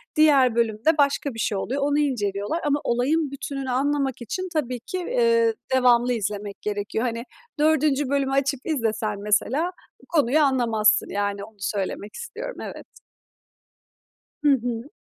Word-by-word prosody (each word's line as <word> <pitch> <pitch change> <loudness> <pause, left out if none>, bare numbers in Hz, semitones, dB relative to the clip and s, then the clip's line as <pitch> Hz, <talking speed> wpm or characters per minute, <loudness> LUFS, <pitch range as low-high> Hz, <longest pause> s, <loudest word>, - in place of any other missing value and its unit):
Diğer 280 -6 +5
bölümde 235 +7 +2
başka 280 -1 +1
bir 225 - -8
şey 210 -2 0
oluyor, 265 +8 -2
onu 290 +1 +2
inceliyorlar 210 - -1
ama 290 0 +2
olayın 275 +5 +1
bütününü 275 -1 -5
anlamak 275 0 0
için 370 - -4
tabii 255 -6 -1
ki, 250 +10 -5
eee, 465 +2 +2 0.2
devamlı 245 -1 +4
izlemek 205 -2 -4
gerekiyor. 210 +2 -2
Hani, 230 -1 -2 0.4
4'üncü 300 -2 +2
bölümü 275 -1 +1
açıp 275 0 +1
izlesen 225 -8 -1
mesela 260 - +1 0.4
konuyu 295 -3 +3
anlamazsın, 235 -7 +3
yani, 205 0 -2
onu 220 +1 -12
söylemek 200 +1 -3
istiyorum, - - -7
evet. - - -7 1.6
Hı 295 - +5
hı. 240 0 -2
260 Hz, 135 wpm, -24 LUFS, 220-295 Hz, 1.6 s, Diğer